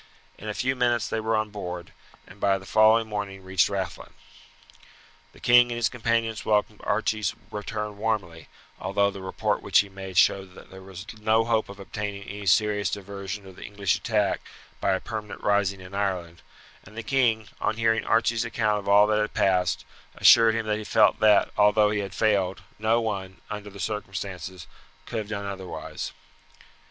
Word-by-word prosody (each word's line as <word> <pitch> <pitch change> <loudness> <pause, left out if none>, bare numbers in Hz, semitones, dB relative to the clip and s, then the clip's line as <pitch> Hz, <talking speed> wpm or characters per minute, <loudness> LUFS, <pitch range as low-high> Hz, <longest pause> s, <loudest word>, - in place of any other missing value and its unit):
In 105 - -6
a 105 - -3
few 130 +1 0
minutes 120 -2 +1
they 110 - -2
were 110 0 0
on 110 -1 -1
board, 90 -4 -6 0.3
and 95 - -15
by 100 -1 +2
the 95 - -12
following 110 +2 +4
morning 100 -2 -5
reached 95 -1 +2
Rathlin. 100 -2 -4 1.2
The - - -18
king 120 0 +6
and - - -2
his 120 -1 +1
companions 115 -3 -1
welcomed 105 0 0
Archie's 110 -1 0 0.2
return 105 0 -5
warmly, 95 -8 -2 0.3
although 100 0 +1
the 95 - -9
report 95 0 -1
which - - +4
he 100 - -9
made 95 -1 -8
showed 95 -1 +3
that - - -14
there 95 0 -11
was 95 0 -10
no 110 +1 +2
hope 115 -2 +1
of 100 0 -10
obtaining 100 0 -5
any 100 0 -7
serious 105 +2 +3
diversion 100 0 -6
of 95 -1 -12
the - - -9
English 100 -2 -1
attack 105 -4 0 0.4
by 95 - +1
a 95 - 0
permanent 110 -2 -6
rising 100 -2 +1
in 95 +1 -12
Ireland; 90 -4 -2 0.4
and 110 - -15
the 115 - -4
king, 115 -5 +1
on 110 - -1
hearing 110 -1 +2
Archie's 115 0 +2
account 110 -3 0
of 100 - -5
all 100 +1 +7
that 105 0 +2
had 105 - -3
passed, 90 -2 +1 0.3
assured 115 -1 +7
him 115 -1 -1
that 105 0 -1
he - - -6
felt - - +3
that, 105 -1 +4
although 105 0 +5
he 105 - 0
had 100 -2 -5
failed, 95 -4 +1 0.2
no 110 +2 +2
one, 95 -4 -4
under 105 0 -6
the 100 0 -12
circumstances, 95 -3 -5 0.4
could 115 - -3
have 105 -1 -6
done 100 -2 -4
otherwise. 95 -2 -6
105 Hz, 185 wpm, -26 LUFS, 95-110 Hz, 1.2 s, all